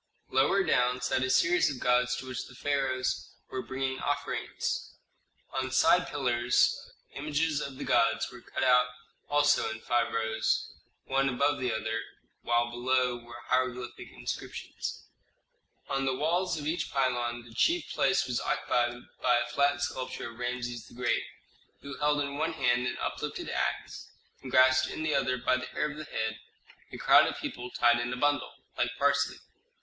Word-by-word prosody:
Lower 145 +10 +3
down 125 -6 +2
sat 125 +1 0
a 130 - 0
series 170 +7 +4
of 135 -3 -5
gods 125 0 +2
to - - -6
which 130 -2 -5
the 125 - -14
pharaohs 135 -2 -1 0.2
were 130 - -2
bringing 130 0 -3
offerings. 145 0 -3 0.6
On 130 -1 -1
side 150 +7 +4
pillars 125 -3 +2 0.4
images 150 +1 0
of 135 -1 -6
the - - -5
gods 115 0 +2
were 120 - -11
cut - - -4
out 125 -1 +5 0.4
also 145 -2 +3
in 110 0 -5
five 120 +1 +1
rows, 110 0 0 0.3
one 135 +1 +2
above 140 +3 +1
the 125 -2 0
other, 110 +1 -2 0.4
while 120 0 +1
below 125 0 +1
were 120 0 -11
hieroglyphic 125 -1 -1
inscriptions. - - -6 0.8
On 135 0 -1
the 130 -1 +1
walls 170 +5 +1
of 145 - -5
each 160 +3 -1
pylon 120 -3 0
the 120 -1 -14
chief 335 - +2
place 190 - +2
was 125 -1 -1
occupied 120 0 0 0.2
by 120 - +4
a 120 - 0
flat 140 +3 +2
sculpture 130 -3 -4
of 115 - -15
Rameses 120 -1 -3
the - - -15
Great, 125 0 +1 0.6
who 140 -1 -7
held 150 0 +2
in 140 0 -3
one 165 +1 0
hand 125 -4 +2
an 120 - -3
uplifted - - -4
axe - - -3 0.3
and 130 - -8
grasped 130 +1 +5
in 155 - -4
the 155 -1 +1
other, 130 -2 +1
by 130 +1 +2
the 130 0 -5
hair 150 0 -2
of 150 - -10
the 155 - -6
head, 110 -4 -3 0.5
a - - -7
crowd - - +6
of - - -3
people 125 0 -5
tied 120 -1 +3
in 120 +1 -2
a 125 - -3
bundle, 145 +1 +1 0.2
like - - +1
parsley. - - +2
130 Hz, 170 wpm, -29 LUFS, 120-140 Hz, 0.8 s, crowd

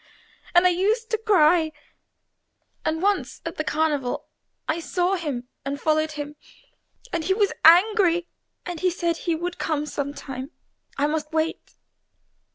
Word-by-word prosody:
And 350 +1 +7
I 365 - +6
used 430 +6 0
to 445 - +2
cry, 340 -6 +4 1.1
and 320 +2 -1
once 390 -10 0
at 330 - -5
the 310 - -1
Carnival 295 -5 0 0.4
I 315 +2 0
saw 360 +2 0
him 290 -9 -3 0.2
and 280 +1 -3
followed 310 0 +1
him, 295 0 -6 0.8
and 335 - 0
he 380 - +2
was 410 -2 +2
angry, 350 0 +6 0.4
and 350 -2 -5
said 345 -2 0
he 335 -1 -1
would 350 +2 -4
come 300 -2 -1
some 285 -1 -4
time, 265 -1 -6 0.5
I 280 - +2
must 305 0 -2
wait. 320 0 -2
325 Hz, 145 wpm, -24 LUFS, 300-360 Hz, 1.1 s, And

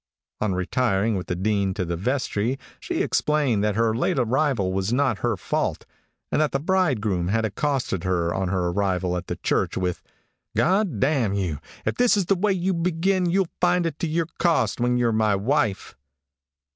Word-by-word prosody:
On 105 -3 0
retiring 105 +2 +1
with 90 - -4
the 90 - -1
Dean 100 0 0
to 95 -3 -2
the 85 0 -2
vestry, 120 +3 -1 0.2
she - - -2
explained 140 -9 +1
that 105 -1 +1
her 115 0 +2
late 150 +7 0
arrival 125 -5 +1
was 95 +3 -1
not 130 -4 +1
her 120 -4 0
fault, - - -2 0.5
and - - +2
that 155 - +1
the 135 - +1
bridegroom 130 - +1
had 110 +4 +1
accosted 125 - -1
her 85 -2 0
on 95 -1 -1
her 90 -1 0
arrival 90 -1 0
at 90 - -4
the - - -3
church - - -1
with, 90 -2 -2 0.6
"G - - +4
d 190 +5 +3
d 100 - +2
n 130 -9 +1
you, 90 -7 -2 0.3
if - - -1
this 245 -3 +4
is 195 - +1
the 195 - +2
way 200 +3 +1
you 185 +1 0
begin 180 +2 +1
you'll 185 0 +1
find 180 0 +2
it 160 -3 -3
to 170 - -1
to - - -4
your 165 0 0
cost 170 -7 +1
when 125 0 +2
you're 120 -1 +2
my 110 -2 +2
wife." 110 0 0
115 Hz, 195 wpm, -24 LUFS, 95-155 Hz, 0.6 s, G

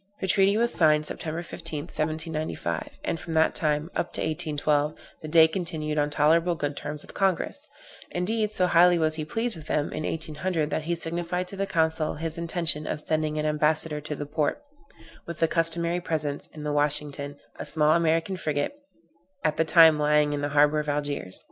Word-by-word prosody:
The - - -2
treaty 195 +1 +4
was 235 +1 +2
signed 155 -2 +4
September 160 +2 -3
5th, 165 0 -6
1795; 155 - -3
and 165 - -1
from 165 0 -6
that 160 0 +4
time, 155 +1 -1
up 170 - -1
to - - -4
1812, 150 -2 0 0.3
the 155 - -6
Dey 160 0 +7
continued 160 -3 -3
on 145 0 +1
tolerable 165 +4 +3
good 145 -2 -3
terms 150 +1 -6
with - - -12
Congress; 195 - -1 0.4
indeed, 210 +4 -1
so 185 -4 +1
highly 175 0 +5
was 155 -1 +1
he 155 -1 -4
pleased 230 +5 -2
with 155 -1 -11
them, 150 -1 -1
in - - -3
1800, 160 0 -2
that 155 - -2
he 170 +1 0
signified 170 +2 -3
to - - -7
the 195 0 -2
consul 160 -2 0
his 165 +1 -3
intention 165 -2 -1
of - - -2
sending 155 0 -1
an 150 - -1
ambassador 150 0 +1
to 150 0 -5
the 145 - -5
Porte, 150 - -1 0.6
with 170 -2 -6
the 165 - +3
customary 170 +1 +1
presents, 150 -4 -3
in 150 - -10
the 150 0 -2
Washington, 145 -1 0 0.2
a - - -4
small 150 0 +3
American 165 +2 +2
frigate, 150 - -2 0.7
at 155 -1 +1
that 160 - +1
time 160 -3 +7
lying 150 0 +3
in 145 - -2
the 145 - -1
harbor 150 +1 +4
of 150 0 -3
Algiers. 145 -10 -2
155 Hz, 190 wpm, -26 LUFS, 150-170 Hz, 0.7 s, Dey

